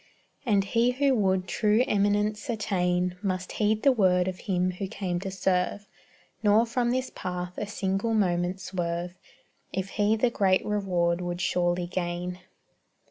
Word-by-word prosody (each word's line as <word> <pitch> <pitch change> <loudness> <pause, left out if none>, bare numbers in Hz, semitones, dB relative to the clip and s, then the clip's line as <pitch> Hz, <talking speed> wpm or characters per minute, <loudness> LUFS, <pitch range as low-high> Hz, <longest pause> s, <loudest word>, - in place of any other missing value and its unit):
And 200 -3 +3
he 235 +5 +2
who 275 +1 +2
would 190 -5 +1
true 215 +5 +2
eminence 205 +1 +1
attain 180 -5 0
Must 185 -3 -2
heed 215 0 0
the 275 - +6
word 185 -6 +3
of 185 -1 -4
Him 185 -2 0
who 185 +2 -5
came 185 -2 -3
to 195 +1 -4
serve, 190 +1 -1 0.5
Nor 215 +2 +4
from 240 +1 0
this 255 +1 -1
path 180 0 -4
a 210 - -4
single 200 +2 -1
moment 180 -2 +1
swerve, 175 -1 -3 0.6
If 190 0 -3
he 210 +1 +2
the 235 +2 +1
great 190 -4 +2
reward 180 -4 0
would 175 0 -3
surely 175 0 +1
gain. 175 0 -3
190 Hz, 150 wpm, -27 LUFS, 180-210 Hz, 0.6 s, the